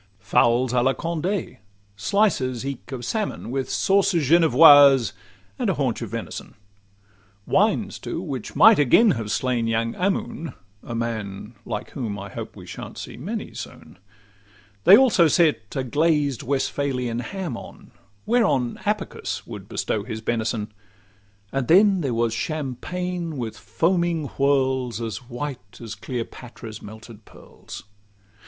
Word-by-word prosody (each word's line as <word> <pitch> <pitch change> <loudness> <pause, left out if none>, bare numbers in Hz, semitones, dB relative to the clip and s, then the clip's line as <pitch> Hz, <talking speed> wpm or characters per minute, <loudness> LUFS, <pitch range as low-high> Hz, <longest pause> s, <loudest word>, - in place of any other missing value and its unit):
Fowls 120 +4 +2
'a 125 - +3
la 135 +2 +2
Conde,' 170 - -3 0.4
slices 130 - 0
eke 140 -1 -6
of 125 -3 -5
salmon, 210 - -3
With 135 -1 -2
'sauces 195 -6 +2
Genevoises,' 145 - +7 0.5
and - - 0
haunch - - -1
of - - -5
venison; - - -6 0.9
Wines 210 +1 +1
too, - - -4
which 140 - -6
might 220 -2 +7
again 195 - +5
have 115 -4 -3
slain 120 0 0
young 115 0 0
Ammon— 180 -3 -2 0.3
A 120 - -7
man 110 -2 -4
like - - -5
whom 115 -7 -4
I 100 +1 -7
hope - - -7
we - - -11
shan't - - -9
see - - -7
many 205 - -5
soon; - - -10 0.9
They 195 - +10
also 230 -10 +5
set 160 -2 +1
a 135 - -1
glazed 145 0 +1
Westphalian 130 -3 -1
ham 180 0 -4
on, - - -12 0.3
Whereon 205 - +1
Apicius - - -3
would - - -9
bestow 110 - -2
his 110 0 -5
benison; 110 -2 -2 0.8
And 135 -3 -2
then 195 +2 +5
there 130 -6 -1
was 115 -1 +1
champagne 160 +5 -4
with 115 -3 -4
foaming 165 - 0
whirls, 130 -3 +1
As 110 -5 -4
white 120 -6 -7
as 115 -3 -7
Cleopatra's 115 0 -7
melted 110 +1 -12
pearls. - - -12
130 Hz, 135 wpm, -23 LUFS, 115-170 Hz, 0.9 s, They